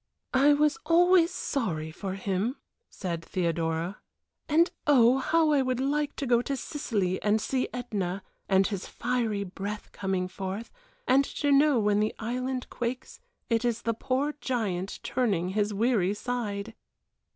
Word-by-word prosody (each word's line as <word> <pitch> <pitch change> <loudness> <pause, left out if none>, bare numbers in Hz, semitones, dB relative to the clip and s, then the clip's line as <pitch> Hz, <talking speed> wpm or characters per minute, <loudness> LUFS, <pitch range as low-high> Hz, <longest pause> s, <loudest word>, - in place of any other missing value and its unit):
"I 280 +3 +6
was 300 +6 +2
always 350 0 +5
sorry 180 - -2
for 190 +3 -5
him," 195 +5 -1 0.3
said 170 -4 -4
Theodora; 170 +1 -1 0.5
"and 330 +4 +4 0.2
oh, 255 -2 +6
how 320 +3 +3
I 285 -2 +4
would 255 -1 -1
like 290 +2 0
to 280 - -3
go 240 -2 +3
to 275 +2 -3
Sicily 205 - -2
and 210 +1 +2
see 255 +4 -1
Ætna 200 -6 -3 0.3
and 195 0 +4
his 200 -2 -3
fiery 235 -5 -1
breath 200 +2 -6
coming 190 -2 -2
forth, 190 +4 -5 0.4
and 275 +2 +5
to 285 +1 -1
know 285 -1 +5
when 210 -2 +2
the 215 +1 0
island 250 +3 -3
quakes 245 +1 -4 0.3
it 230 0 +1
is 235 -1 -1
the 230 - +1
poor 270 +5 -1
giant 200 -7 -2
turning 200 -9 0
his 205 +2 0
weary 205 -2 +1
side!" 220 -3 -3
230 Hz, 150 wpm, -28 LUFS, 195-265 Hz, 0.5 s, I